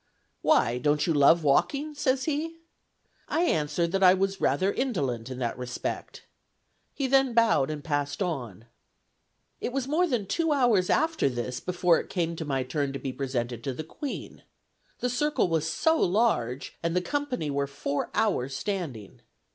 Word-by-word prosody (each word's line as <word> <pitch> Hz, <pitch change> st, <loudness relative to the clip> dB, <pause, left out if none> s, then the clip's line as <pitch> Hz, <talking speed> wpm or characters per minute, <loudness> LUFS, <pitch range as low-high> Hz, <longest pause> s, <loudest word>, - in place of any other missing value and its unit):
'Why, 120 Hz, +2 st, +3 dB
don't 150 Hz, +2 st, +2 dB
you 165 Hz, -, +1 dB
love 155 Hz, +3 st, +5 dB
walking?' 280 Hz, -, +2 dB
says 270 Hz, -3 st, 0 dB
he. 320 Hz, +3 st, -2 dB, 0.7 s
I 335 Hz, -, +1 dB
answered, 165 Hz, -, 0 dB
that 195 Hz, +1 st, 0 dB
I 185 Hz, -1 st, +7 dB
was 195 Hz, 0 st, -1 dB
rather 185 Hz, +9 st, +2 dB
indolent 135 Hz, -, -2 dB
in 130 Hz, -, -6 dB
that 125 Hz, -1 st, -3 dB
respect. 125 Hz, 0 st, -5 dB, 0.7 s
He 275 Hz, -, -3 dB
then 265 Hz, -2 st, +3 dB
bowed 225 Hz, -, +4 dB
and 150 Hz, -1 st, -5 dB
passed 145 Hz, -2 st, -2 dB
on. 120 Hz, -, -4 dB, 0.9 s
It -, -, -3 dB
was 265 Hz, 0 st, -2 dB
more 335 Hz, +5 st, +2 dB
than 245 Hz, -, -1 dB
two 325 Hz, -, +1 dB
hours 240 Hz, -10 st, +3 dB
after 320 Hz, -, +2 dB
this 125 Hz, 0 st, -4 dB
before 180 Hz, -2 st, +2 dB
it -, -, -8 dB
came 170 Hz, -2 st, -1 dB
to 160 Hz, -, -4 dB
my 135 Hz, -3 st, -1 dB
turn 135 Hz, +2 st, -2 dB
to -, -, -3 dB
be 135 Hz, -, -4 dB
presented 125 Hz, -4 st, -3 dB
to 135 Hz, -2 st, -2 dB
the 155 Hz, -, -5 dB
Queen. 270 Hz, -, -7 dB, 0.6 s
The 250 Hz, -, +1 dB
circle 295 Hz, -2 st, +1 dB
was 160 Hz, -2 st, 0 dB
so 320 Hz, -, +2 dB
large 175 Hz, -, 0 dB
that 170 Hz, 0 st, -1 dB
the 180 Hz, -, +3 dB
company 255 Hz, -, -2 dB
were 140 Hz, 0 st, 0 dB
four 140 Hz, 0 st, -3 dB
hours 135 Hz, -, +1 dB
standing. 145 Hz, -, -4 dB
170 Hz, 170 wpm, -27 LUFS, -, 0.9 s, I